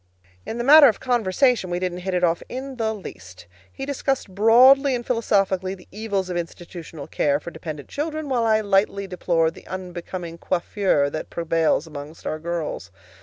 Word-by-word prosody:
In 230 Hz, -, -4 dB
the 240 Hz, -, -2 dB
matter 290 Hz, +2 st, +9 dB
of 220 Hz, -, +1 dB
conversation 240 Hz, -2 st, +1 dB
we 175 Hz, -, -1 dB
didn't 180 Hz, 0 st, -3 dB
hit 185 Hz, 0 st, -3 dB
it 180 Hz, -, 0 dB
off 170 Hz, -1 st, +2 dB
in 260 Hz, +1 st, -6 dB
the 220 Hz, -2 st, 0 dB
least. 90 Hz, -, -10 dB, 0.3 s
He 270 Hz, -, -6 dB
discussed 270 Hz, -6 st, -2 dB
broadly 255 Hz, +6 st, +6 dB
and 240 Hz, -1 st, -5 dB
philosophically 195 Hz, -5 st, 0 dB
the 180 Hz, -, -17 dB
evils 200 Hz, -2 st, -2 dB
of 180 Hz, -, -4 dB
institutional 170 Hz, -3 st, -7 dB
care 145 Hz, 0 st, 0 dB
for 170 Hz, -, -8 dB
dependent 155 Hz, -3 st, -7 dB
children, 310 Hz, +1 st, -4 dB
while 250 Hz, -4 st, 0 dB
I 220 Hz, -1 st, +3 dB
lightly 200 Hz, -1 st, +1 dB
deplored 170 Hz, -3 st, 0 dB
the -, -, -15 dB
unbecoming 180 Hz, -2 st, -6 dB
coiffure 175 Hz, -5 st, 0 dB
that 155 Hz, -, -5 dB
prevails 165 Hz, -2 st, 0 dB
among 150 Hz, 0 st, -9 dB
our 155 Hz, -, -3 dB
girls. 165 Hz, -, -4 dB
185 Hz, 170 wpm, -23 LUFS, 170-230 Hz, 0.3 s, matter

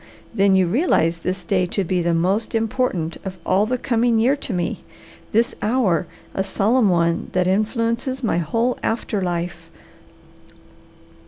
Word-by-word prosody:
Then 195 Hz, -3 st, +3 dB
you 190 Hz, -1 st, +4 dB
realize 170 Hz, -, +1 dB
this 185 Hz, +3 st, -3 dB
day 185 Hz, -3 st, +1 dB
to 195 Hz, +2 st, -1 dB
be 180 Hz, 0 st, 0 dB
the 170 Hz, 0 st, +1 dB
most 195 Hz, +8 st, 0 dB
important 220 Hz, -7 st, -1 dB
of 190 Hz, -2 st, -6 dB
all 200 Hz, +3 st, +2 dB
the 255 Hz, +2 st, 0 dB
coming 235 Hz, -1 st, +1 dB
year 245 Hz, +5 st, +3 dB
to 280 Hz, -, -6 dB
me; 175 Hz, -3 st, -2 dB, 0.5 s
this 230 Hz, +2 st, +2 dB
hour 210 Hz, -8 st, +1 dB, 0.3 s
a 190 Hz, -, 0 dB
solemn 210 Hz, +4 st, +2 dB
one 170 Hz, -1 st, +1 dB
that 185 Hz, -1 st, +2 dB
influences 230 Hz, +6 st, 0 dB
my 210 Hz, -6 st, +1 dB
whole 230 Hz, +10 st, 0 dB
after 220 Hz, -3 st, -1 dB
life. 175 Hz, -1 st, -3 dB
195 Hz, 150 wpm, -21 LUFS, 180-230 Hz, 0.5 s, you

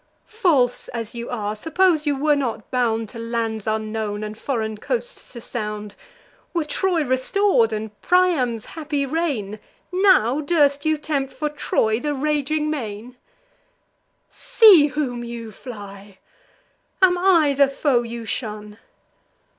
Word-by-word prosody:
False 320 Hz, -, +1 dB
as 230 Hz, -2 st, -6 dB
you 235 Hz, 0 st, -6 dB
are, 215 Hz, -3 st, -3 dB
suppose 320 Hz, -, +1 dB
you 290 Hz, -, +2 dB
were 295 Hz, +2 st, +3 dB
not 240 Hz, -6 st, -3 dB
bound 230 Hz, -3 st, 0 dB
To 230 Hz, -, -9 dB
lands 230 Hz, -2 st, -3 dB
unknown, 215 Hz, -1 st, -2 dB
and 215 Hz, 0 st, -5 dB
foreign 220 Hz, -3 st, -3 dB
coasts -, -, -4 dB
to 235 Hz, -, -8 dB
sound; 210 Hz, -3 st, -5 dB, 0.6 s
Were 335 Hz, -3 st, 0 dB
Troy 340 Hz, +2 st, 0 dB
restor'd, 260 Hz, -, +2 dB
and 215 Hz, 0 st, -4 dB
Priam's 310 Hz, -12 st, +2 dB
happy 295 Hz, -3 st, -2 dB
reign, 260 Hz, -9 st, -2 dB, 0.3 s
Now 360 Hz, -, +3 dB
durst 285 Hz, -2 st, +2 dB
you 315 Hz, 0 st, +2 dB
tempt, 285 Hz, -3 st, -2 dB
for 295 Hz, +3 st, -3 dB
Troy, 220 Hz, -6 st, 0 dB
the 295 Hz, +2 st, -2 dB
raging 300 Hz, +1 st, 0 dB
main? 235 Hz, -3 st, -5 dB, 1.1 s
See 430 Hz, -11 st, +6 dB
whom 260 Hz, -5 st, -3 dB
you 235 Hz, -2 st, -7 dB
fly! 200 Hz, -4 st, -11 dB, 0.8 s
am 375 Hz, -2 st, +5 dB
I 350 Hz, -5 st, +4 dB
the 280 Hz, 0 st, +4 dB
foe 270 Hz, -2 st, +1 dB
you 235 Hz, -1 st, -7 dB
shun? 210 Hz, -1 st, -5 dB
260 Hz, 130 wpm, -22 LUFS, 220-305 Hz, 1.1 s, See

